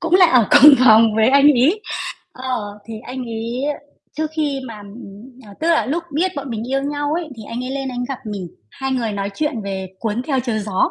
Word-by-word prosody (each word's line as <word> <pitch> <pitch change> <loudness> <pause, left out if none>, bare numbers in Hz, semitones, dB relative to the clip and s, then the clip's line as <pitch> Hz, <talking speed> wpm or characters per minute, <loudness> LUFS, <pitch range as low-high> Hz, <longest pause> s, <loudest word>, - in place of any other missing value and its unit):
cũng 335 0 0
là 365 -1 +7
ở 250 - +3
cùng 290 +1 +9
phòng 220 -2 +6
với 220 +2 +4
anh 280 +1 +5
ấy. 295 - +2 0.5
Ờ, 245 -6 -5
thì 225 - -6
anh 255 0 -6
ấy 230 +2 -4 0.5
trước 310 0 -2
khi 290 -3 -1
mà, 225 -3 -8
ừm, 210 +4 -13
ờ 200 - -13
tức 325 - 0
là 330 - +2
lúc 325 +6 -1
biết 365 +5 +1
bọn 275 -2 -5
mình 230 +2 -5
yêu 270 0 0
nhau 290 +1 -2
ấy 335 -1 -3
thì 220 - -9
anh 240 +2 -4
ấy 255 - -5
lên 270 0 -3
anh 250 -1 -5
ấy - - -2
gặp 270 -3 -4
mình, 200 -4 -5 0.2
hai 265 0 -4
người 235 -4 -1
nói 200 0 -3
chuyện 300 +3 -1
về 190 -1 -4
"Cuốn 225 +1 -2
Theo 265 -1 0
Chiều 235 -3 -2
Gió." 205 -3 0
250 Hz, 235 wpm, -19 LUFS, 220-285 Hz, 0.5 s, cùng